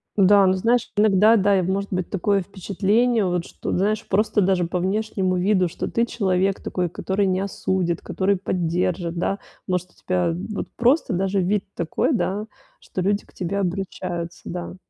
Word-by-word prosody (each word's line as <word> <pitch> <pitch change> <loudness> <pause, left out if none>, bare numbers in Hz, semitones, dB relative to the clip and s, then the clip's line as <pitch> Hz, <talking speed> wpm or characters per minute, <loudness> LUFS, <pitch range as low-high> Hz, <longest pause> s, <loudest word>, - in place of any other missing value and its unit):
Да, 200 0 +6
ну, 185 - +4
знаешь, 230 +5 +1
иногда, 210 +2 +5
да, 200 0 +3
и 185 - +1
может 195 +2 -2
быть, 185 -2 -1
такое 200 +1 +1
впечатление, 205 +4 +1
вот, 175 -1 -1
что, - - -6
ты - - 0
знаешь, 215 +3 0
просто 210 +1 +2
даже 185 -2 +2
по 180 +2 -2
внешнему 190 -1 0
виду, 185 -1 +2
что 165 - -5
ты 235 0 +1
человек 195 -4 0
такой, 180 -1 -2
который 190 +4 -1
не 185 -1 +1
осудит, 190 -3 -1
который 195 0 0
поддержит, 175 -1 -1
да? 195 +3 -1 0.3
Может, 180 -1 -2
у - - -28
тебя 180 -2 0 0.2
вот - - -3
просто 245 - +2
даже 195 +2 +1
вид 195 +2 0
такой, 170 - 0
да, 210 -1 -1 0.3
что 185 - -5
люди 200 +2 0
к - - -24
тебе 185 +2 -3
обращаются, 175 -2 -3
да? 175 0 -5
190 Hz, 175 wpm, -23 LUFS, 180-205 Hz, 0.3 s, Да